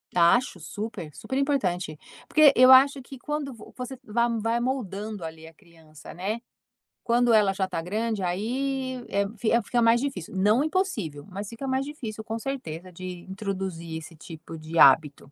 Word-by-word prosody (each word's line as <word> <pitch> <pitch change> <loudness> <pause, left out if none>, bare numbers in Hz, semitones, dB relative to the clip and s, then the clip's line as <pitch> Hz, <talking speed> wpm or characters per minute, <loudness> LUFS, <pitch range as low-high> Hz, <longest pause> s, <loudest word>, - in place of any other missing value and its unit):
Acho, 180 +4 +3
super, 180 -2 -6
super 265 - -5
importante, 185 - 0 0.3
porque 310 -2 +7
eu 255 +1 +8
acho 275 +2 +7
que 260 +1 -11
quando 295 0 -3
vo 225 - -13
você 250 +1 -5
vai 235 +1 +1
vai 225 +2 0
moldando, 215 -5 -3
ali, 160 0 -8
a 160 - -13
criança, 160 -3 -15
né. 200 +6 -3 0.6
Quando 240 0 +3
ela 210 -3 +4
já 190 -1 -1
tá 180 -3 -3
grande, 215 +3 -2
aí, 255 +7 -2
é 200 0 +1
fi 220 +2 0
fica 240 +3 0
mais 230 +1 +5
difícil, 270 - -4
não 210 +7 +3
impossível, 285 - -2
mas 200 +2 -6
fica 235 +4 -6
mais 265 +1 0
difícil, 230 -7 -7
com 225 +1 -4
certeza, 185 - -5
de 180 0 -8
introduzir 190 -4 -4
esse 160 +1 -10
tipo 160 +1 -10
de 160 +1 -3
hábito. 140 0 +5
210 Hz, 170 wpm, -26 LUFS, 175-255 Hz, 0.6 s, eu